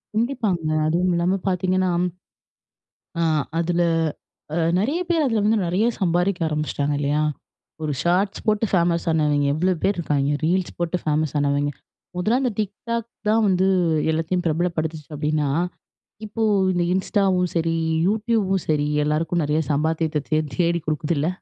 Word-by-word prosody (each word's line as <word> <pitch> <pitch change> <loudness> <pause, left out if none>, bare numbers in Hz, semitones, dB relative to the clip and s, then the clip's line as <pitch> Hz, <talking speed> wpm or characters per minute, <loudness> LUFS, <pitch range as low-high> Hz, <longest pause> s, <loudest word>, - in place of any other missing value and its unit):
கண்டிப்பாங்க. 220 - 0 0.2
அதுவும் 180 +3 +1
இல்லாம 180 +3 +1
பார்த்தீங்கன்னா, 185 0 +1 1.3
அ - - +2 0.4
அதில 175 +1 +1 0.7
அ - - 0 0.2
நிறைய 280 - 0
பேர் 325 -4 +2
அதில 225 -5 +1
வந்து 220 +1 +3
நிறைய 190 +6 +1
சம்பாரிக்க 180 +1 +1
ஆரம்பிச்சிட்டாங்க 150 -1 -1
இல்லையா? 145 +1 +1 0.6
ஒரு 150 - -1
ஷார்ட்ஸ் 185 +3 +1
போட்டு 215 +1 +2
ஃபேமஸ் 170 -2 +2
ஆனவிங்க 150 -2 +2
எவ்வளோ 180 +3 +2
பேர் 195 -2 +1
இருக்காங்க, 145 -3 0
ரீல்ஸ் 180 +2 0
போட்டு 175 +1 0
ஃபேமஸ் 155 -1 0
ஆனவிங்க. 145 0 +1 0.5
முதல்ல 220 +8 +2
அந்த 250 -3 +1
டிக் 205 -1 -1 0.2
டாக் 235 -1 -1 0.2
தான் 220 0 +3
வந்து 185 0 +2 0.5
எல்லாத்தையும் 165 +3 -1
பிரபலப்படுத்துச்சு 160 -1 -2
அப்படின்னா. 150 -1 0 0.8
இப்போ 215 +2 -5 0.3
இந்த 175 0 +1
இன்ஸ்டாவும், 190 -2 +1
சரி 165 0 +1 0.3
யூடியூபும் 210 -3 +1
சரி 150 -1 +2 0.2
எல்லாருக்கும் 160 +2 0
நிறைய 150 +2 +1
சம்பாத்தியத்த 155 0 0
தே 155 - +2 0.2
தேடி 170 -1 +1
கொடுக்குதுல்ல? 155 0 0
175 Hz, 135 wpm, -23 LUFS, 155-195 Hz, 1.3 s, வந்து